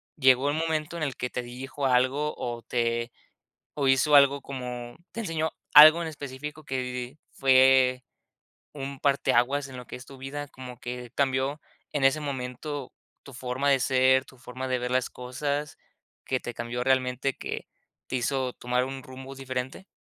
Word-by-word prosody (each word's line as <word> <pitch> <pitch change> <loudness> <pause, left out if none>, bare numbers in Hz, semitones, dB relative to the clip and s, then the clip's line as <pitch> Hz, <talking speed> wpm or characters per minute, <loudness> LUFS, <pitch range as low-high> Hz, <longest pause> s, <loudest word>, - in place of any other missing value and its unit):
¿llegó 130 -1 +4
el 145 - 0
momento 160 0 -1
en 160 - -3
el 140 -3 -2
que 125 - -2
te 125 - -3
dijo 130 +3 -6
algo 130 +4 +2
o 120 -1 -4
te 120 0 -1 0.6
o 140 -2 -1
hizo 135 +3 +4
algo 140 0 +6
como 125 -2 -6 0.2
te 230 - -5
enseñó 160 -6 -1 0.2
algo 155 +3 +10
en 165 - -3
específico 150 +1 -7
que 125 +1 -4
fue 130 -1 +5 0.7
un 140 -1 -6
parteaguas 140 0 +2
en 130 - -9
lo 125 - -9
que - - -6
es 125 - -12
tu 135 -1 -12
vida, 145 +2 -5
como 125 -3 -10
que 125 -1 -6
cambió 135 +2 0 0.3
en 140 -2 0
ese 135 +3 +4
momento 135 0 -5 0.3
tu 140 - -12
forma 125 +3 -2
de 135 -2 +4
ser, 130 +1 +4
tu 130 - -18
forma 130 +1 -6
de 130 -1 +1
ver 125 0 -3
las 130 -1 +1
cosas, 145 +4 -4 0.5
que 130 - 0
te 120 - -6
cambió 120 +1 -3
realmente, 130 0 +1
que - - -5 0.4
te - - -6
hizo 130 +1 -1
tomar 125 +1 0
un 135 0 -6
rumbo 130 +1 -10
diferente? 130 +6 -5
130 Hz, 170 wpm, -27 LUFS, 125-140 Hz, 0.7 s, algo